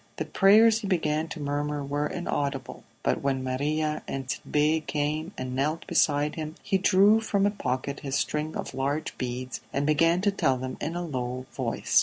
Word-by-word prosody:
The - - -3
prayers 215 +3 +5
he 210 - -5
began 160 -4 0
to 160 - -7
murmur 145 0 -2
were 145 +2 -1
inaudible, 140 -6 -3 0.2
but - - +1
when 135 -1 0
Maria 150 +4 -1
and 135 -1 -4
Tit'Bé 150 +5 0
came 155 +3 -1
and 130 0 -4
knelt 150 +5 -1
beside 145 0 +2
him 155 -1 -5
he 195 -2 +1
drew 200 +3 +5
from 200 -3 +1
a 205 - +3
pocket 140 -7 -3
his 135 -1 -3
string 155 +1 -1
of - - -5
large 140 +3 -2
beads 125 0 -4
and 140 +1 0
began 165 +3 +3
to 205 +1 +3
tell 145 -9 +1
them 130 +1 -5
in 165 +3 -3
a 175 0 -2
low 130 -4 -3
voice. - - +1
150 Hz, 185 wpm, -27 LUFS, 135-165 Hz, 0.2 s, prayers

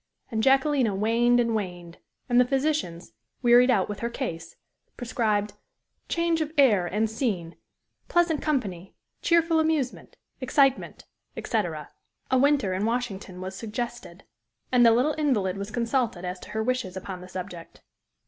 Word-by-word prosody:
And 220 -1 0
Jacquelina 265 -3 +3
waned 235 +4 +3
and 230 -1 +1
waned. 175 -4 -5 0.3
And 245 -1 +3
the - - +7
physicians, 270 - -1 0.3
wearied 245 +1 +6
out 205 -7 +3
with 205 -1 -6
her 235 - -2
case, 235 -10 -5 0.4
prescribed 215 -5 -1 0.6
"Change 335 -1 +1
of 310 -1 -2
air 210 -11 +4
and 215 +5 0
scene 210 -8 -3 0.5
pleasant 340 -3 +2
company 195 - -2 0.3
cheerful 335 -2 +3
amusement 315 -5 -1 0.2
excitement," 270 +1 +1 0.3
etc. - - -3 0.4
A 260 - +4
winter 275 -8 +2
in 190 +2 -2
Washington 210 -6 -3
was 190 +1 -6
suggested. 235 +3 -6 0.5
And 250 -1 +5
the 230 - +8
little 255 +7 +2
invalid 210 -11 +1
was 200 +1 -5
consulted 230 -4 -1
as 180 0 -5
to - - -12
her 220 0 -2
wishes 240 -6 -2
upon 185 -1 -7
the 180 - -10
subject. 180 -2 -9
235 Hz, 145 wpm, -26 LUFS, 190-265 Hz, 0.6 s, the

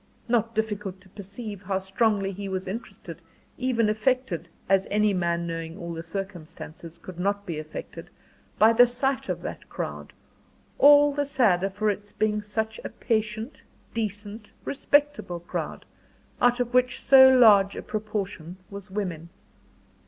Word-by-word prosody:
Not 230 -1 +1
difficult 210 -3 -2
to 190 - -20
perceive 200 +1 -8
how 190 0 -1
strongly 195 +1 0
he 195 +1 -6
was 185 0 -3
interested, 210 +5 -7 0.4
even 250 -3 +1
affected 215 -5 0 0.2
as 195 0 +3
any 210 0 +2
man, 170 -2 0
knowing 165 0 -5
all 170 -3 -6
the 165 - -5
circumstances, 170 -2 -8
could 180 -2 -11
not 200 +2 0
but - - -29
be 165 -4 -4
affected 155 0 -8 0.5
by 220 +1 +6
the 245 +2 +7
sight 265 +2 -1
of - - -3
that - - -7
crowd, - - -6 0.7
all 290 0 +7
the 290 0 0
sadder 215 -10 +2
for 210 +2 0
its 205 0 -8
being 210 -1 0
such 220 +1 -3
a - - -4
patient, 220 +3 -2 0.3
decent, 210 -1 -5
respectable 285 -10 +1
crowd, 175 - -5 0.6
out 245 0 +4
of 245 0 -2
which 250 0 +2
so 265 -1 +8
large 215 -6 +6
a - - -6
proportion 200 -6 -4
was 200 0 -9
women. 180 -5 -4
210 Hz, 150 wpm, -26 LUFS, 190-230 Hz, 0.7 s, so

